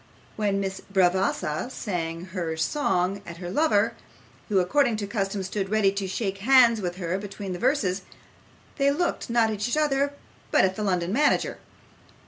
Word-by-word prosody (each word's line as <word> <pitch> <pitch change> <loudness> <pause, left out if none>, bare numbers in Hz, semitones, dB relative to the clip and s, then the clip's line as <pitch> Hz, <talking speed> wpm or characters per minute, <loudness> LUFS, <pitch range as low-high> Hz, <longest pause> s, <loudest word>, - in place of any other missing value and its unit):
When 205 -2 0
Miss 195 -1 -3
Bravassa 185 -1 +1
sang 170 -8 -4
her 165 -4 -2
song 190 - 0
at 170 -3 -9
her 175 0 -6
lover, 230 -5 +2 0.6
who 205 - +2
according 235 +5 +2
to 210 - -3
custom 200 -2 -2
stood 190 +1 -3
ready 210 -2 +3
to 195 -1 -3
shake 195 0 -3
hands 235 -1 +5
with 175 -2 -3
her 180 0 -2
between 200 -1 -6
the 175 - -5
verses, 215 -8 +1 0.8
they 275 0 +4
looked, 315 -1 -1
not 230 -1 +3
at 210 +1 -2
each 245 - -1
other, 285 -2 +1 0.4
but - - +4
at 190 0 -1
the 215 - -5
London 180 -2 0
manager. 295 +5 +2
200 Hz, 165 wpm, -26 LUFS, 185-235 Hz, 0.8 s, hands